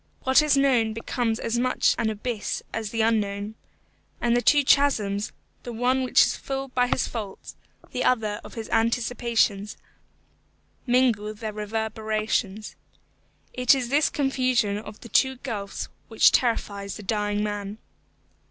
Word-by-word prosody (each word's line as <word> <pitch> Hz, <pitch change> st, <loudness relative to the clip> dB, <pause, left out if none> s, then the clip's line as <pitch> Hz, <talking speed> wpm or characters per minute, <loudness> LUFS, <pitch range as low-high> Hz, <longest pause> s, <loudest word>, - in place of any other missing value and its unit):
What 260 Hz, +3 st, +5 dB
is 300 Hz, -2 st, +3 dB
known 250 Hz, -5 st, +3 dB
becomes 230 Hz, 0 st, -2 dB
as 230 Hz, +1 st, -1 dB
much 255 Hz, +1 st, +2 dB
an 230 Hz, -2 st, +1 dB
abyss 220 Hz, 0 st, -3 dB
as 220 Hz, -2 st, -3 dB
the 225 Hz, +1 st, -1 dB
unknown. 210 Hz, -2 st, 0 dB, 0.7 s
And 240 Hz, 0 st, +2 dB
the 245 Hz, -, +2 dB
two 290 Hz, +3 st, +4 dB
chasms, 215 Hz, -8 st, +2 dB, 0.3 s
the 240 Hz, -, -7 dB
one 250 Hz, +3 st, +1 dB
which 255 Hz, -, +5 dB
is -, -, 0 dB
full 270 Hz, 0 st, -5 dB
by 250 Hz, -1 st, +1 dB
his 250 Hz, -, 0 dB
faults, 210 Hz, -5 st, -7 dB, 0.4 s
the 250 Hz, -, -2 dB
other 215 Hz, -4 st, +1 dB
of -, -, -11 dB
his 225 Hz, -2 st, -5 dB
anticipations, 230 Hz, -3 st, +1 dB, 1.1 s
mingle 235 Hz, -4 st, +2 dB
their 215 Hz, 0 st, -5 dB
reverberations. 215 Hz, -1 st, -2 dB, 0.8 s
It 250 Hz, +2 st, +4 dB
is 250 Hz, -3 st, -3 dB
this 290 Hz, +3 st, +3 dB
confusion 255 Hz, -7 st, +1 dB
of 210 Hz, 0 st, -11 dB
the 235 Hz, -, -10 dB
two 265 Hz, +2 st, +3 dB
gulfs 215 Hz, -6 st, -5 dB, 0.2 s
which 225 Hz, -, +5 dB
terrifies 200 Hz, -5 st, -1 dB
the 215 Hz, -, -9 dB
dying 210 Hz, 0 st, -1 dB
man. 205 Hz, 0 st, -4 dB
225 Hz, 145 wpm, -25 LUFS, 210-250 Hz, 1.1 s, What